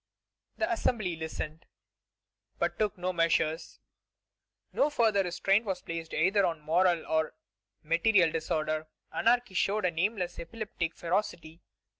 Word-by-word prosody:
'" - - -51
The 335 - 0
Assembly 215 - 0
listened, 160 0 -6 0.9
but - - -1
took 210 -1 0
no 180 +1 -2
measures. 165 -1 0 0.9
No 290 - +3
further 225 -8 +3
restraint 195 +3 +2
was 190 -4 -3
placed 165 -1 -5
either 190 +6 +3
on 165 -3 0
moral 170 +3 +2
or 160 0 0 0.5
material 170 +2 +3
disorder. 155 -1 -1 0.3
Anarchy 240 -3 +2
showed 200 +2 +1
a 180 - +2
nameless 180 +2 -1
epileptic 175 -3 -4
ferocity. 170 -2 -2
180 Hz, 125 wpm, -30 LUFS, 165-210 Hz, 0.9 s, No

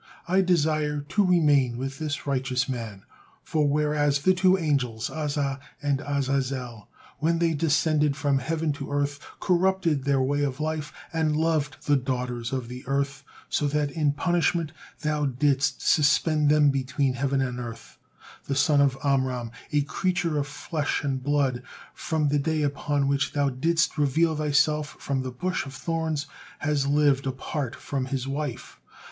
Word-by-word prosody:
I 190 +2 +3
desire 155 -4 +1
to 205 - +3
remain 145 -9 +3
with 135 +1 -5
this 150 -2 -3
righteous 130 -2 0
man; 115 -7 -5 0.4
for 150 -2 +1
whereas 145 -1 +1
the 185 - +5
two 185 +1 +4
angels 135 -9 -1
Azza 145 -3 -2 0.2
and 145 -2 0
Azazel 135 -5 -2 0.3
when 165 +3 +2
they 165 -1 +2
descended 150 -1 +2
from 140 -2 +1
heaven 160 +3 -1
to 140 -1 -7
earth, 145 0 -1 0.2
corrupted 180 -5 +2
their 140 -1 +2
way 140 +2 +1
of 140 -1 -1
life 155 -1 -2 0.2
and 155 -2 +1
loved 155 -3 0
the 145 -1 +4
daughters 125 -2 -3
of 130 -3 -3
the 125 +1 -8
earth, 140 0 -1 0.2
so 145 - 0
that 145 0 0
in 150 -1 +1
punishment 170 -1 +1 0.3
Thou 150 -1 0
didst 135 +1 +1
suspend 150 0 +3
them 150 -1 +5
between 135 0 0
heaven 135 +2 0
and 125 -2 -1
earth, 115 -2 -8 0.5
the 140 - -2
son 145 +1 +4
of 135 -2 +2
Amram, 130 -4 0 0.2
a 145 -1 +2
creature 175 +1 -1
of 140 - -2
flesh 150 0 -2
and 135 -2 -1
blood, 135 -3 +1 0.3
from 155 -3 -1
the 145 +1 +2
day 155 +1 0
upon 145 0 0
which 140 +1 0
Thou 145 -1 +2
didst 165 +4 +1
reveal 155 +3 +2
Thyself 150 0 +1
from 135 -1 -2
the 130 - -4
bush 130 +6 -2
of 135 - -9
thorns, 160 0 -2 0.3
has 145 -2 0
lived 140 -2 +3
apart 135 0 -3
from 135 -2 -3
his 135 -1 -3
wife. 140 -2 -5
145 Hz, 160 wpm, -26 LUFS, 135-155 Hz, 0.5 s, the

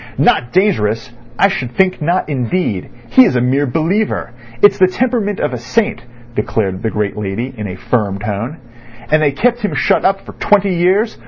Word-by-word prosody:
"Not 120 - +2
dangerous—I 120 - 0
should 130 -11 -4
think 185 -3 +2
not 170 +4 0
indeed. 125 - -2 0.2
He 260 - +8
is 130 - +2
a - - +3
mere 135 +4 +1
believer. 165 - -1 0.3
It's 205 -1 +6
the 185 - +6
temperament 215 -1 -1
of - - -1
a 125 - -4
saint," 125 - -1 0.3
declared 100 -3 -1
the 110 - -1
great 105 -2 -2
lady 105 +5 -4
in 105 -3 -5
a 90 - -6
firm 100 -1 -1
tone. 105 +8 -4 0.5
"And 155 0 +4
they 145 -2 +3
kept 240 - +1
him 210 - -2
shut 195 - +2
up 195 0 +2
for - - -9
twenty 200 -2 +2
years. 190 +6 +1
140 Hz, 180 wpm, -16 LUFS, -, 0.5 s, He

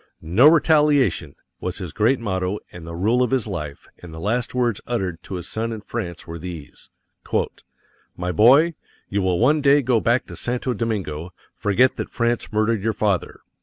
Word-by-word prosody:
"No 95 - +5
Retaliation" 150 - +3 0.2
was 90 0 -4
his 90 -6 -6
great 115 +7 +2
motto 95 -3 -2
and 85 -2 -10
the 85 - -6
rule 110 +8 +2
of 125 - +2
his 130 -4 +1
life; 75 -9 -6
and 90 - -11
the 80 - -8
last 115 +7 -1
words 120 -4 0
uttered 95 -8 -2
to 95 - -7
his 90 - -6
son 115 +1 -3
in 110 -2 -5
France 95 -6 -5
were 85 -1 -7
these: 80 -4 -9 1.3
"My 90 0 -2
boy, 135 - +5 0.4
you 100 0 0
will 95 -2 +1
one 145 - +3
day 140 0 +5
go 120 -2 +2
back 120 +3 +1
to - - -9
Santo 125 +1 -2
Domingo; 95 -7 -3 0.2
forget 120 +6 +2
that - - -4
France 120 0 -1
murdered 110 -1 +1
your 110 0 +1
father." 100 -7 -1
105 Hz, 180 wpm, -22 LUFS, 90-125 Hz, 1.3 s, No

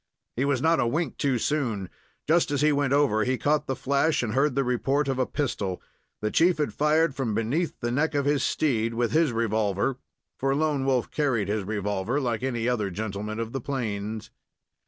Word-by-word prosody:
He 130 - 0
was 140 -2 0
not 165 -1 +4
a 120 - +2
wink 145 +3 -2
too 135 -3 +1
soon. 115 -8 -1 0.4
Just 165 +2 +3
as 145 -1 0
he 150 0 +4
went 140 -2 +1
over 140 -7 +3
he 130 +2 0
caught 150 +5 +1
the 135 - -1
flash, 140 +3 +1
and 110 -2 -2
heard 135 +1 +2
the 140 - +2
report 135 +3 0
of 135 -1 -1
a 130 - +1
pistol. 100 -10 -2 0.4
The 105 0 -1
chief 175 +1 +4
had 150 - -1
fired 155 +1 +2
from 130 -6 -2
beneath 135 +10 -1
the 120 -1 -1
neck 150 +4 0
of 140 -1 +1
his 145 -1 +2
steed, 115 -7 0
with 120 0 0
his 160 -3 +3
revolver 110 +2 0 0.4
for 135 +1 +1
Lone 150 -2 0
Wolf 130 -3 +1
carried 125 -10 0
his 105 -1 -1
revolver, 105 +4 -1
like 120 -4 -1
any 120 -3 -1
other 110 -5 0
gentleman 105 +2 -4
of 115 0 -3
the 135 - -3
plains. 110 -5 -4
130 Hz, 200 wpm, -26 LUFS, 110-145 Hz, 0.4 s, not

